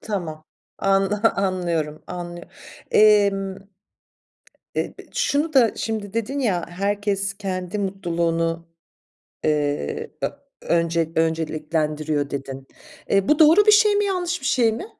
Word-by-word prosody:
Tamam, 165 -7 -5 0.3
an 195 0 +2 0.3
anlıyorum. 170 -6 -1
Anlıyo 175 -1 -7 0.5
emm, 200 -2 +4 1.2
eee, - - -2
b - - -11
şunu 330 -11 0
da 240 -6 +5
şimdi 215 -3 -4
dedin 230 +5 -2
ya: 195 -10 0
"Herkes 200 +1 -1
kendi 185 -1 -4
mutluluğunu, 170 -3 -1 0.8
eee, 145 - -1
ö - - +2 0.3
önce 165 -1 0
önceliklendiriyor." 155 -2 -1
dedin. 135 -1 -6 0.4
Eee, 195 -1 +2
bu 300 - +3
doğru 325 +7 +7
bir 425 - +7
şey 420 0 +5
mi? 415 0 +2
Yanlış 360 -3 -1
bir - - -7
şey 240 -3 +3
mi? 225 - -5
195 Hz, 120 wpm, -22 LUFS, 165-220 Hz, 1.2 s, doğru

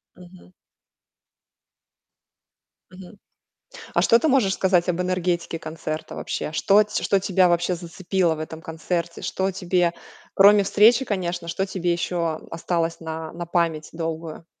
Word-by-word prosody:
Мгм. 180 0 -16 2.4
Мгм. 190 +2 -13 0.8
А - - +3
что 230 - +5
ты 320 - -1
можешь 250 -9 +3
сказать 185 -2 +2
об 180 0 0
энергетике 180 -2 -1
концерта 155 -1 -6
вообще? - - -4
Что 200 +6 +4
ть 210 0 -4
что 195 - +2
тебя 185 -1 +3
вообще 175 +1 +1
зацепило 175 0 -1
в - - -9
этом 160 +1 -7
концерте? 170 +1 -4
Что 190 +1 -1
тебе 180 -2 0 0.4
кроме 200 +1 +7
встречи, 225 +6 +5
конечно, 180 -6 -3
что 190 +3 -1
тебе 180 -2 -1
ещё 170 -2 -2
осталось 165 0 -2
на 160 -1 -6
на 175 +1 -6
память 170 -3 -1
долгую? 165 -1 -5
175 Hz, 135 wpm, -23 LUFS, 165-190 Hz, 2.4 s, кроме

